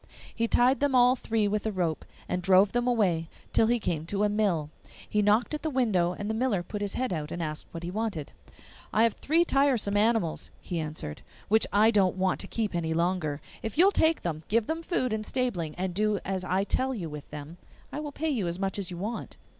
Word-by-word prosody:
He 230 Hz, 0 st, 0 dB
tied 250 Hz, +4 st, +4 dB
them 285 Hz, -2 st, +1 dB
all 250 Hz, 0 st, +6 dB
three 225 Hz, -4 st, 0 dB
with 210 Hz, 0 st, -1 dB
a -, -, 0 dB
rope, 175 Hz, -5 st, -2 dB, 0.2 s
and 180 Hz, -, -1 dB
drove 190 Hz, +2 st, +5 dB
them 240 Hz, 0 st, 0 dB
away 180 Hz, -9 st, +1 dB, 0.2 s
till 220 Hz, -, +4 dB
he 240 Hz, +1 st, +3 dB
came 165 Hz, -6 st, -2 dB
to 200 Hz, +3 st, 0 dB
a 210 Hz, -, +3 dB
mill. 190 Hz, -8 st, 0 dB, 0.4 s
He 210 Hz, -, +1 dB
knocked 210 Hz, +7 st, +2 dB
at 300 Hz, -, -3 dB
the 315 Hz, -, -1 dB
window, 210 Hz, -, +1 dB
and 205 Hz, +3 st, -5 dB
the 220 Hz, -, -1 dB
miller 220 Hz, -6 st, 0 dB
put 205 Hz, +4 st, -6 dB
his 205 Hz, -1 st, -2 dB
head 255 Hz, -6 st, -1 dB
out 150 Hz, -2 st, -4 dB
and 175 Hz, -, -4 dB
asked 155 Hz, -2 st, -4 dB
what 165 Hz, 0 st, -8 dB
he 175 Hz, -, -4 dB
wanted. 205 Hz, -8 st, -3 dB, 0.6 s
'I 220 Hz, -, +3 dB
have 230 Hz, -2 st, +3 dB
three 330 Hz, +4 st, +2 dB
tiresome 270 Hz, -9 st, +2 dB
animals,' 215 Hz, -5 st, +1 dB
he 175 Hz, -, -4 dB
answered, 150 Hz, -, -5 dB, 0.3 s
'which 220 Hz, +2 st, +4 dB
I 215 Hz, +3 st, +5 dB
don't 190 Hz, -4 st, +3 dB
want 185 Hz, 0 st, +1 dB
to -, -, -3 dB
keep 220 Hz, -3 st, -2 dB
any 160 Hz, -2 st, -1 dB
longer. 170 Hz, -4 st, 0 dB, 0.2 s
If 225 Hz, +2 st, -5 dB
you 350 Hz, -, +7 dB
will 400 Hz, -, +5 dB
take 320 Hz, -4 st, +2 dB
them, 155 Hz, -3 st, -2 dB
give 225 Hz, +1 st, +2 dB
them 325 Hz, +5 st, -2 dB
food 260 Hz, -, 0 dB
and 215 Hz, 0 st, -2 dB
stabling, 210 Hz, -11 st, -2 dB
and 185 Hz, 0 st, -2 dB
do 210 Hz, +2 st, +1 dB
as 190 Hz, -1 st, -2 dB
I 185 Hz, +2 st, +1 dB
tell 260 Hz, +5 st, 0 dB
you 180 Hz, -7 st, -4 dB
with 150 Hz, -2 st, -8 dB
them, 150 Hz, +3 st, -8 dB, 0.3 s
I -, -, -4 dB
will 300 Hz, -1 st, -5 dB
pay 310 Hz, +2 st, -2 dB
you 220 Hz, -10 st, -1 dB
as 170 Hz, +1 st, -2 dB
much 195 Hz, +1 st, -2 dB
as 190 Hz, -, -4 dB
you 175 Hz, -, -6 dB
want. 210 Hz, +6 st, -5 dB
205 Hz, 235 wpm, -28 LUFS, 175-235 Hz, 0.6 s, you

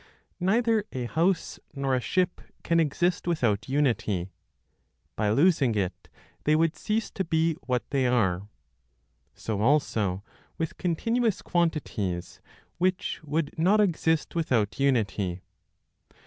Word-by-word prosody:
Neither 220 Hz, +4 st, +2 dB
a 125 Hz, -2 st, -3 dB
house 165 Hz, +7 st, 0 dB, 0.2 s
nor 135 Hz, -1 st, 0 dB
a 130 Hz, -, +1 dB
ship 180 Hz, +11 st, 0 dB, 0.2 s
can 170 Hz, 0 st, +2 dB
exist 170 Hz, +3 st, 0 dB
without 120 Hz, -11 st, 0 dB
unity; 110 Hz, -10 st, 0 dB, 0.8 s
by 105 Hz, -1 st, 0 dB
losing 140 Hz, -, +3 dB
it 95 Hz, -3 st, -3 dB, 0.3 s
they 150 Hz, -, +3 dB
would 165 Hz, +1 st, +2 dB
cease 220 Hz, +1 st, -2 dB
to 190 Hz, -, -2 dB
be 165 Hz, -1 st, +1 dB
what 125 Hz, -2 st, -1 dB
they 135 Hz, -3 st, +2 dB
are. 100 Hz, -6 st, +1 dB, 0.9 s
So 105 Hz, -2 st, -3 dB
also 110 Hz, -8 st, +1 dB, 0.3 s
with 165 Hz, -1 st, -4 dB
continuous 225 Hz, +5 st, 0 dB
quantities 140 Hz, -, -1 dB, 0.4 s
which 185 Hz, +1 st, 0 dB
would 150 Hz, 0 st, -2 dB
not 195 Hz, +6 st, +4 dB
exist 165 Hz, -5 st, +1 dB
without 125 Hz, -10 st, 0 dB
unity. 100 Hz, -9 st, 0 dB
145 Hz, 120 wpm, -27 LUFS, 110-175 Hz, 0.9 s, not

